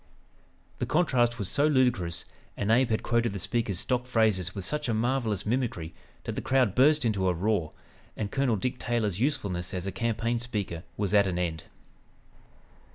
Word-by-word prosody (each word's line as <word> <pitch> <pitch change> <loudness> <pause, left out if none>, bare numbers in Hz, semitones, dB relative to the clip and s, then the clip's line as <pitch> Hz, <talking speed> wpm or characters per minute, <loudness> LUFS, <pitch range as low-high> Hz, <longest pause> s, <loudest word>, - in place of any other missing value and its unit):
'" - - -34
The - - -1
contrast 125 -8 +2
was 100 -5 -3
so 145 +8 +2
ludicrous, 120 - +1 0.3
and 105 +1 0
Abe 125 +2 +4
had 110 - 0
quoted 115 -2 +1
the - - -3
speaker's 100 0 -1
stock 125 -1 -1
phrases 105 -7 +1
with 95 -3 -4
such 150 +5 -2
a 115 - +1
marvelous 115 -4 0
mimicry 110 -9 -1 0.3
that - - -3
the - - -2
crowd 130 -7 +2
burst 145 +3 +4
into 100 -4 +1
a 90 - +2
roar, 90 -3 0 0.4
and 105 -2 -3
Colonel 135 -4 +1
Dick 125 +5 -2
Taylor's 110 -6 -1
usefulness 95 -9 -1
as 90 0 -3
a 100 - -2
campaign 115 +3 -1
speaker 105 -8 -4 0.2
was 100 -2 -1
at 100 -1 +5
an 90 -2 -2
end. 85 -3 -2
110 Hz, 180 wpm, -28 LUFS, 95-125 Hz, 0.4 s, at